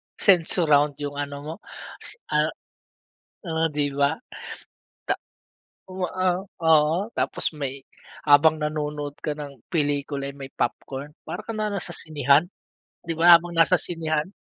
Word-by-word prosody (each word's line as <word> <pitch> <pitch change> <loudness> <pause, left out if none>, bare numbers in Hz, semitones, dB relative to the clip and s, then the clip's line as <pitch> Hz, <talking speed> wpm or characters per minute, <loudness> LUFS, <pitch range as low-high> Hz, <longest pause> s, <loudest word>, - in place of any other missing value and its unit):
sensurround 160 -5 +4
yung 145 0 -4
ano 145 0 -4
mo 155 +2 -5 0.4
s - - -2 0.2
ah, - - +2 0.9
ah, 165 -1 0
di 145 -1 0
ba, 140 +1 +2 0.9
ta - - +1 0.7
o 185 -2 -3
a 185 0 +1
oo, 160 -4 +3 0.2
tapos - - -1
may 140 -2 -4 0.5
habang 155 +2 +6
nanonood 150 -1 -3
ka 150 -1 -3
ng 140 -4 -8
pelikula 145 -3 -1
eh, - - -18
may 135 -1 -8
popcorn, 135 +4 -3
para - - -6
ka 225 - -4
na 215 0 -1
nasa 195 -4 -2
sinehan, 150 +2 +2 0.6
di 165 - -2
ba, 170 +1 +8
habang 175 +1 -8
nasa 165 +2 +5
sinehan? 160 -1 -1
150 Hz, 135 wpm, -24 LUFS, 145-165 Hz, 0.9 s, ba